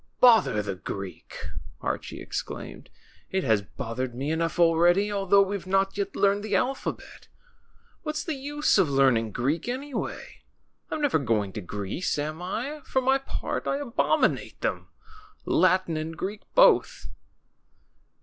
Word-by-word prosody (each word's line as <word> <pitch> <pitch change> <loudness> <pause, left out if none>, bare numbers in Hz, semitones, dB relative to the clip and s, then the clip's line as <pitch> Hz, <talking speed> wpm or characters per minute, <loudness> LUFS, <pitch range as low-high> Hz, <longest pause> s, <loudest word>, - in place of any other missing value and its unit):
Bother 220 - +5
the 100 -1 -3
Greek!" 95 0 -7 0.4
Archie - - -4
exclaimed. - - -6 0.4
It 190 0 0
has 110 -5 +3
bothered 120 +3 -5
me 140 +4 -2
enough 165 +1 -1
already, 175 +4 +4
although 200 0 +4
we've 195 -1 -4
not 195 +1 +1
yet 200 -1 -3
learned 200 +1 +2
the 210 -2 -1
alphabet. 260 +7 -3 0.7
What's 305 -1 -3
the 320 - -2
use 290 -2 +1
of 180 -6 +3
learning 130 -5 +3
Greek, 140 - -1
anyway? 265 +2 -5 0.5
I'm 310 - -3
never 285 - +2
going 105 -7 0
to - - -5
Greece, 100 - -3
am 155 +3 -3
I? 260 +11 -4
For 265 - 0
my 265 +1 +3
part 270 - -4
I 275 - +1
abominate 275 -4 0
them, - - -2 0.6
Latin 185 -1 +3
and 160 +1 -4
Greek 205 +2 -4
both." - - +4
185 Hz, 140 wpm, -26 LUFS, -, 0.7 s, Bother